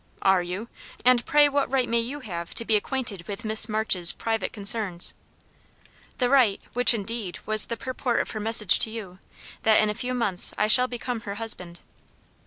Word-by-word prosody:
"Are 190 -1 +3
you? 180 +6 -6 0.4
And 250 -1 +4
pray 295 0 +5
what 285 -2 -1
right 260 -2 0
may 235 0 0
you 265 +6 -5
have 170 -7 -7
to 230 - +3
be 220 - +2
acquainted 210 -5 -2
with 205 +2 -7
Miss 220 +1 +2
March's 210 -5 +1
private 225 -1 -3
concerns?" 205 -4 +1 1.0
"The 250 - +1
right 245 -7 +3
which, 245 0 +5
indeed, 205 -3 -4
was 215 -1 +2
the 230 - -5
purport 255 0 -3
of - - -3
her 215 - -6
message 215 -2 +4
to - - +4
you 200 -5 -9 0.4
that 220 -1 +3
in 215 -1 +1
a - - -4
few 250 +3 -5
months 205 -7 0
I 210 - +1
shall 250 +4 +5
become 245 -1 -5
her 200 -3 -7
husband." 185 -6 -4
220 Hz, 190 wpm, -24 LUFS, 200-245 Hz, 1.0 s, pray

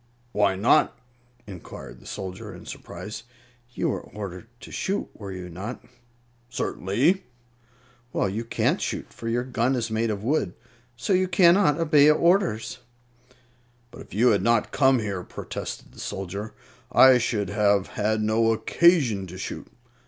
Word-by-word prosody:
"Why 100 -3 +2
not?" 120 +8 +3 0.5
inquired 70 -10 -10
the - - -15
soldier, 95 -1 -6
in - - -12
surprise. 105 +2 -8 0.5
"You - - 0
were - - -2
ordered 100 0 -8
to - - -11
shoot, 195 +2 -2
were 100 -2 -8
you 90 -1 -6
not?" 95 +8 -7 0.6
"Certainly." 130 - 0 0.9
"Well, - - 0
you 105 +4 -3
can't 115 - 0
shoot, - - -4
for 115 - -5
your 120 +1 0
gun 125 0 0
is 115 -2 -2
made 110 +1 0
of 105 -1 -3
wood. 120 - 0 0.4
So 190 - 0
you 185 0 +3
cannot 175 -4 +4
obey 150 -3 +5
orders." 150 - +2 1.1
"But 125 - -11
if - - -14
you 120 +5 +4
had 100 -3 +3
not 115 +1 +2
come 135 -2 +4
here," 100 -5 -3
protested - - -7
the - - -16
soldier, 100 +3 -5 0.4
"I 130 -1 +7
should 105 -4 -1
have 100 -2 +2
had 110 +1 0
no 115 +1 +3
occasion 115 - +3
to 90 +1 -9
shoot. 95 - -6
110 Hz, 150 wpm, -25 LUFS, 100-130 Hz, 1.1 s, I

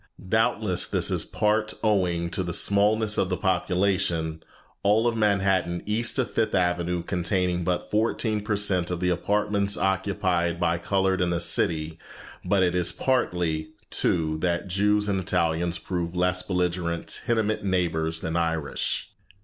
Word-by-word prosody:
Doubtless 110 -3 +1
this - - +1
is - - -1
in - - -19
part 105 0 0
owing 90 -5 +1
to 95 - -1
the 85 -2 -1
smallness 105 +1 +3
of 95 - +1
the 90 - -1
population, 90 -4 0 0.4
all 105 +3 +3
of 120 - 0
Manhattan 95 -5 +1
east 115 +5 0
of 130 - -1
Fifth 110 -3 0
Avenue 90 -1 0
containing 90 0 0
but 90 +1 -2
fourteen 110 0 0
per 105 0 -1
cent 95 -4 +1
of 90 -1 -3
the 90 0 0
apartments 100 +2 0
occupied 95 -3 0
by 85 -1 +1
colored 95 +1 0
in 90 - +1
the 85 -1 0
city; 80 -1 0 0.4
but 95 +1 +2
it 90 -1 +1
is 90 -1 +1
partly, 85 -11 -1 0.2
too, 80 -2 +1
that 85 +2 -1
Jews 105 +3 +1
and 100 -2 0
Italians 85 -2 0
prove 85 -1 -4
less 90 +1 +1
belligerent 90 -2 -2
tenement 110 -3 0
neighbors 85 -4 -1
than 80 +1 -3
Irish. 80 -3 -1
90 Hz, 150 wpm, -25 LUFS, 85-105 Hz, 0.4 s, smallness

